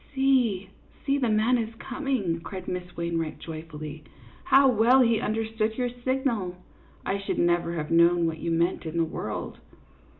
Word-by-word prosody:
" - - -25
See, 245 -8 +2 0.3
see, 280 0 +2
the 245 -4 +1
man 220 +3 +3
is 225 0 -4
coming," 245 - -2
cried 190 +1 -7
Miss 180 -1 -5
Wain 170 -1 -1
wright, 160 -1 -4
joyfully. 155 -2 -8 0.2
" 115 - -23
How 270 +1 +7
well 250 +2 +5
he 230 -2 +3
understood 220 0 -1
your 250 -1 0
signal! 240 -9 -1 0.5
I 200 - -1
should 195 - -3
never 175 0 +2
have 155 -2 -4
known 170 +1 +5
what 160 -1 -2
you 170 - -3
meant 165 +1 0
in 160 +1 -4
the 165 - +3
world." 160 - -5
195 Hz, 175 wpm, -26 LUFS, 170-245 Hz, 0.5 s, How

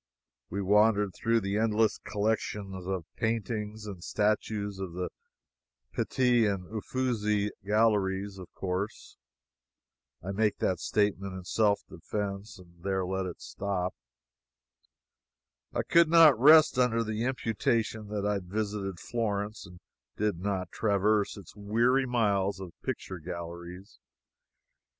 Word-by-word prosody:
We 100 +2 -2
wandered 105 0 +4
through 115 0 +1
the 100 +1 -1
endless 110 -1 +2
collections 100 -3 -2
of 95 -4 -2
paintings 110 -1 -2
and 95 -4 -7
statues 105 -1 -1
of 95 -3 -5
the 90 +1 -3 0.8
Pitti 125 -3 +2
and 100 -3 -2
Ufizzi 105 -3 0
galleries, 100 -2 +1
of 90 - -10
course. 95 +2 -4 1.1
I 95 - -3
make 105 +1 +1
that 90 - 0
statement 100 -2 0
in 95 - -7
self 100 +2 +2
defense; 100 0 -5 0.2
there 95 +1 -1
let 95 0 -2
it 90 - -8
stop. 95 -2 -2 1.8
I - - -1
could 170 -1 +5
not 160 -7 +7
rest 155 0 +7
under 115 -2 +3
the 110 +1 -2
imputation 115 -3 -1
that 105 -1 -3
I 105 -1 +1
visited 100 -1 -3
Florence 105 -3 -3
and 90 0 -14 0.4
did 105 -5 0
not 95 -2 -2
traverse 105 0 +1
its 95 -3 -12
weary 120 +6 +2
miles 100 -5 +1
of 95 -3 -7
picture 95 -1 -4
galleries. 85 +3 -8
105 Hz, 120 wpm, -29 LUFS, 95-110 Hz, 1.8 s, not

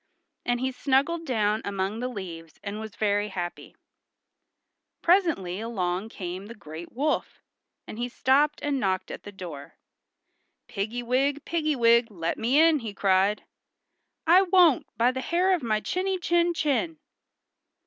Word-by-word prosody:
And 245 0 +1
he 260 +1 -1
snuggled 285 +6 0
down 215 -3 +1
among 200 +2 -2
the 250 - -2
leaves 170 -9 -8
and 205 +1 -5
was 220 -2 -8
very 205 -1 +1
happy. 175 -4 -6 1.3
Presently 330 - +2
along 200 -3 -2
came 185 -1 -6
the 230 - -9
great 160 -4 -9
wolf, 295 +5 -2 0.4
and 215 - -8
he 245 +1 -2
stopped 285 +5 +2
and 285 -2 0
knocked 190 -5 -1
at - - -7
the 205 - -10
door. 165 -8 -9 0.9
"Piggy 225 +5 -3
wig, 270 +4 0
piggy 310 -3 0
wig, 235 -1 +4
let 170 -5 -3
me 250 +6 +3
in!" 320 -1 +5
he 220 -5 -6
cried. 195 +1 +2 0.8
"I 350 +3 +7
won't, 360 -6 +4
by 240 +2 +4
the 260 0 -4
hair 360 +6 +2
of 360 - 0
my 220 -3 0
chinny 375 - -1
chin 345 -1 +1
chin!" 310 +2 0
235 Hz, 150 wpm, -26 LUFS, 200-300 Hz, 1.3 s, I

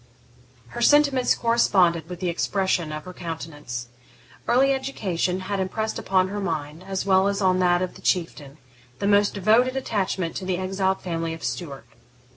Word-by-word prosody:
Her 240 - -6
sentiments 280 -1 +4
corresponded 185 -8 +2
with 180 0 -7
the 180 - 0
expression 175 -2 0
of 155 0 -6
her 185 - -8
countenance. 150 -8 -6 0.6
Early 270 +3 +4
education 190 -9 -2
had 195 +1 -3
impressed 220 +4 -2
upon 185 -1 +1
her 205 +1 -4
mind, 160 -3 -4
as 195 -1 -2
well 190 0 +4
as 200 0 -1
on 185 -2 +2
that 175 0 +3
of 185 - -4
the - - -14
Chieftain, 155 -5 -2 0.4
the 200 - -3
most 205 0 +3
devoted 225 +6 +3
attachment 190 -8 -2
to 190 - -5
the 185 -1 -1
exiled 190 +1 -1
family 165 -2 -3
of 165 - -13
Stuart. 135 0 -5
185 Hz, 165 wpm, -24 LUFS, 165-205 Hz, 0.6 s, sentiments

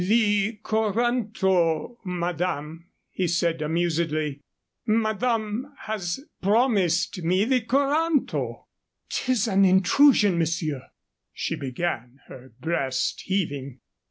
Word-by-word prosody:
"The 210 +1 +2
coranto, 215 -4 +1
madame," 170 -2 -3 0.2
he 185 - -1
said, 170 -1 0
amusedly; 155 -2 -1 0.5
"madame 225 +3 0
has 195 -4 -3 0.2
promised 195 -4 +2
me 185 +5 +2
the 255 +1 +2
coranto." 285 +5 0 0.5
"'Tis 250 -4 0
an 195 -2 +3
intrusion, 195 +1 +5
monsieur," 160 -4 -1 0.5
she - - -3
began, 130 -2 -4
her 130 0 -12
breast 135 -3 -1
heaving. 140 -9 -2
185 Hz, 90 wpm, -25 LUFS, 165-220 Hz, 0.5 s, intrusion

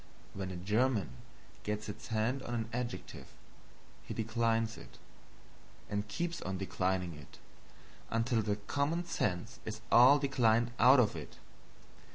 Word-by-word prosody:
When 95 -1 -4
a 90 - -5
German 105 - +1 0.5
gets 105 0 -3
his 105 - -7
hands 115 +4 0
on 120 -2 -4
an 115 -1 -3
adjective, 125 0 -5 0.8
he - - -6
declines 115 0 0
it, - - -13 0.9
and 100 0 -1
keeps 170 0 -3
on 95 0 -3
declining 95 -2 -1
it 75 -2 -13 0.7
until 115 0 +1
the 105 -1 0
common 145 +11 -1
sense 110 - -2
is 110 0 -6
all 125 +4 +8
declined 120 -4 +2
out 130 +1 +8
of 105 -7 +3
it. 80 - -8
115 Hz, 135 wpm, -33 LUFS, 100-125 Hz, 0.9 s, all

